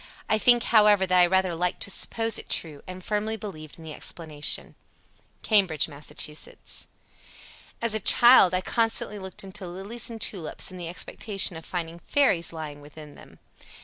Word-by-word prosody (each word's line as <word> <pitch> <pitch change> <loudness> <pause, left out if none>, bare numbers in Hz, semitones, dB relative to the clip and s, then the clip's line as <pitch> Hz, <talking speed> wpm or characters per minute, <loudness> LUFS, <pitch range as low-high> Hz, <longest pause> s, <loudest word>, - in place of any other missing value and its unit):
I 215 - +1
think, 240 +2 +5
however, 210 -3 +4
that 185 -1 +3
I 175 - +6
rather 190 0 +1
liked 180 +2 -2
to 200 - -4
suppose 225 +2 +2
it - - -11
true 150 -4 -3
and 185 0 -9
firmly 215 +2 -2
believed 155 -8 -9
in 165 - -13
the 155 -1 -8
explanation." 155 -3 -2 0.7
Cambridge, 190 -9 +3
Mass. 145 -1 -8
83. 150 0 -3 1.3
"As 230 -2 +3
a 220 - +3
child, 240 -2 +6
I 185 - 0
constantly 225 -1 0
looked 190 0 -7
into 195 -1 -8
lilies 195 +8 -5
and 230 -1 -8
tulips 185 -4 -1
in 185 - -10
the 175 -2 -6
expectation 195 +3 0
of 160 - -9
finding 170 -1 -5
fairies 180 - +1
lying 155 -3 -8
within 150 0 -13
them." - - -16
185 Hz, 170 wpm, -25 LUFS, 165-210 Hz, 1.3 s, I